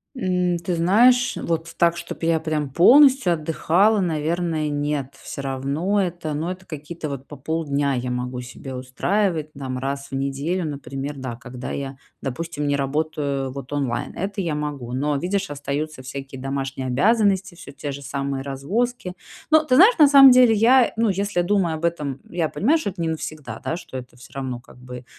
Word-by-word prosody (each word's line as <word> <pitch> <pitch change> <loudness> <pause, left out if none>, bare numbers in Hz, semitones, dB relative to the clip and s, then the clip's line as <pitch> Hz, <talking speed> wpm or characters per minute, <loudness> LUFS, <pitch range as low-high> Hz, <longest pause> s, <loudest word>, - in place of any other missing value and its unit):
М, 180 -6 0
ты 170 +1 -2
знаешь, 235 +9 +4
вот 165 0 -3
так, 170 0 +3
чтоб - - -7
я 165 -1 +2
прям 155 -3 -2
полностью 260 - +6
отдыхала, 170 +6 +2
наверное, 165 -2 -1
нет. 145 -2 -2
Всё - - -6
равно 140 +9 0
это, 175 -4 -3
ну, 155 +4 -2
это 185 +1 -7
какие-то, 155 0 -6
вот, 140 -1 -6
по 145 - -9
полдня 145 -1 -1
я 125 0 -2
могу 125 0 -3
себе 125 +2 -9
устраивать, 155 +5 -1
там, 130 -2 -5
раз 140 +2 -3
в - - -5
неделю, 140 +7 -1
например, 140 -1 -5
да, 130 -3 -5
когда 125 +1 -8
я, 135 -1 -5 0.2
допустим, 150 +2 -4
не 145 - +2
работаю, 140 -1 -1
вот, 135 0 -8
онлайн. 140 -4 -2
Это 195 +2 -3
я 165 -4 -1
могу, 145 -5 -4
но, 145 +3 0
видишь, 190 +5 -1
остаются 145 0 -4
всякие 135 0 -7
домашние 135 -1 -3
обязанности, 195 - +2
всё - - -11
те 145 +1 -5
же 140 +1 -7
самые 140 0 -3
развозки. 180 - -2 0.4
Но 310 0 +6
ты 255 -4 +3
знаешь, 410 - +7
на 300 - +9
самом 275 -2 +9
деле 250 -2 +6
я, 240 +4 +5
ну, 225 -1 +2
если 200 -1 0
думая 180 -4 +1
об 160 +2 -3
этом, 150 -6 -2
я 170 -3 -1
понимаю, 285 +11 +2
что 310 - -2
это 185 -2 -7
не 165 - 0
навсегда, 155 -7 -6
да, 165 - -2
что 130 - -8
это 125 -1 -10
всё 125 +1 -15
равно 130 -3 -4
как 120 - -18
бы 125 0 -9
155 Hz, 185 wpm, -23 LUFS, 135-180 Hz, 0.4 s, на